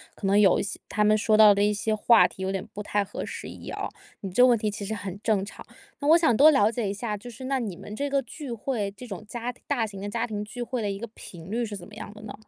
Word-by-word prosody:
可 - - -7
能 200 +2 +4
有 195 -3 +5
一 - - 0
些 200 - -5
他 210 - +1
们 215 0 +5
说 215 0 +3
到 210 -2 +9
的 200 - 0
一 210 +1 +3
些 215 +1 -1
话 225 +2 +5
题， - - -12
有 190 0 -1
点 195 -1 -3
不 205 - -5
太 205 0 0
合 - - -6
时 - - -6
宜 - - -9
啊。 - - -3 0.3
你 195 -2 -5
这 225 - +3
个 250 - +8
问 240 -2 +5
题 210 -1 -1
其 205 0 -6
实 220 +2 -3
很 195 -1 -6
正 205 -4 +1
常， 200 - -10 0.4
那 285 - -2
我 325 +3 +8
想 320 -9 +3
多 295 +7 +8
了 220 -7 +4
解 225 -4 -2
一 - - -2
下， 210 0 -3
就 225 +4 -9
是 240 +2 -10
那 265 0 0
你 205 -7 -4
们 210 - -8
这 285 +4 -2
个 275 - +2
聚 275 +2 -8
会， 225 -3 -2
这 250 - -9
种 200 -4 -7
家 240 +2 -4
庭 250 - -23
大 255 -6 +1
型 200 -3 -8
的 205 - -4
家 230 +2 -1
庭 210 -2 -4
聚 240 +3 -6
会 240 0 -3
的 205 - -1
一 195 - -3
个 235 - -5
频 175 -3 -11
率 235 +2 0
是 210 -3 -4
怎 175 - -11
么 210 - -16
样 210 - -8
的 210 - -11
呢？ 210 - -7
215 Hz, 340 characters per minute, -26 LUFS, 205-240 Hz, 0.4 s, 到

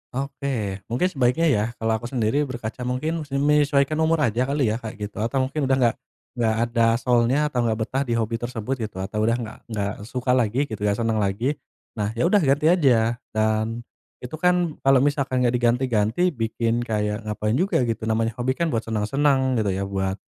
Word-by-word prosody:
Oke. 130 -7 -3
Mungkin, 125 +10 +1
sebaiknya 135 +4 +2
ya, 105 -5 +2
kalau 110 -1 -1
aku 120 - -6
sendiri 130 +4 0
berkaca, 120 -2 -6
mungkin 155 +5 -2
se 140 - -5
menyesuaikan 145 +1 +2
umur 160 -1 +2
aja 120 +2 +1
kali 140 -5 +1
ya, 110 - -2
kayak 110 -3 -7
gitu. 105 - -10
Atau 125 +5 0
mungkin 135 +1 -2
udah 135 - +3
nggak 120 -3 +2 0.4
nggak 110 -2 +1
ada 115 0 +1 0.2
soul-nya 125 +2 +2
atau 125 - -1
nggak 110 -1 +1
betah 130 +4 -2
di 120 - 0
hobi 115 0 -1
tersebut, 120 +1 -3
gitu. 105 -4 -4
Atau 105 +2 -4
udah 115 - +3
nggak 115 -2 -6
nggak 105 -3 -2
suka 125 +1 -1
lagi, 125 +1 +2
gitu, 110 -7 -6
nggak 105 0 +1
senang 115 -1 +1
lagi, 105 +8 -1 0.4
nah, 105 0 -1
ya 115 - 0
udah, 190 +5 +4
ganti 150 0 +3
aja. 120 -9 +3 0.2
Dan, 110 +2 0 0.4
itu 125 - -8
kan, 180 -2 +1
kalau 135 -1 +4
misalkan 140 -3 +1
nggak 120 -1 +2
diganti-ganti, 120 +5 +1
bikin 115 -2 -1
kayak 105 0 -2
ngapain 105 +2 -1
juga, 185 -7 +2
gitu, 115 -2 -2
namanya 115 0 +1
hobi 130 +2 0
kan, 170 +1 -1
buat 115 -2 -1
senang-senang, 130 +4 +1
gitu 100 -3 0
ya, 100 - -2
buat 95 -1 -2
120 Hz, 195 wpm, -23 LUFS, 110-135 Hz, 0.4 s, udah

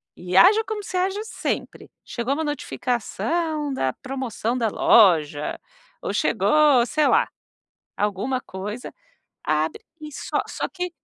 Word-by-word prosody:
e 180 +1 -2
haja 425 - +7
como 435 -2 -4
você 370 - -4
haja 385 +3 0
sempre. 445 - -4 0.2
Chegou 240 +3 -2
uma 320 - -2
notificação 295 +2 -2
da 130 - 0
promoção 255 -3 -3
da 235 -3 +1
loja 160 -10 +3 0.4
ou - - -3
chegou 295 -5 +4
sei 300 +3 +1
lá 450 +3 +4 0.7
alguma 210 +6 -1
coisa, 205 +5 -7 0.5
abre 155 +1 0 0.2
e 305 0 -8
só 285 - -2
só - - -3
que 360 -1 -4
260 Hz, 130 wpm, -23 LUFS, 210-320 Hz, 0.7 s, haja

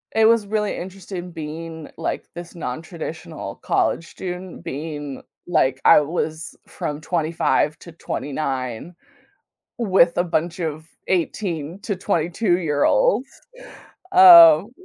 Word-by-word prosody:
It 220 0 +4
was 225 -2 +3
really 210 0 -1
interesting 180 -1 -7
being 160 0 -7
like - - -3
this 175 +1 -9
non-traditional 160 -1 -7
college 170 - 0
student 180 0 -7
being 145 -1 -6 0.3
like 135 -6 +1
I - - +7
was 155 +1 -4
from 150 0 -5
25 160 -2 0
to 170 - -12
29, 135 -2 -4 0.8
with 190 -6 +3
a 175 - +2
bunch 170 0 -2
of 160 -1 -4 0.2
18 170 -2 -2
to 205 - -2
22 175 +2 0
year 150 -5 0
olds. - - +2 0.8
Um. 340 - +9
170 Hz, 115 wpm, -21 LUFS, 155-190 Hz, 0.8 s, Um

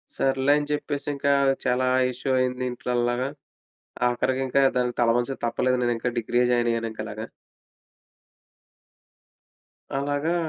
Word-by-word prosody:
సర్లే 135 +1 +2
అని 145 0 -2
చెప్పేసింకా 145 -1 -1 0.3
చాలా 125 0 +2 0.2
ఇష్యూ 130 +2 -5
అయింది 130 0 -1
ఇంట్లో 125 0 -5
అల్లాగా. 120 +2 0 0.8
ఆఖరికింకా 130 +2 +1 0.2
దానికి 125 -1 -1
తలవంచక 120 +3 +1
తప్పలేదు. 125 +2 +1
నేనింకా 120 0 0
డిగ్రీయే 120 +2 +1
జాయినయ్యానింకలాగా. 115 -2 -1 2.7
అలాగా 145 +4 0
125 Hz, 90 wpm, -25 LUFS, 120-135 Hz, 2.7 s, సర్లే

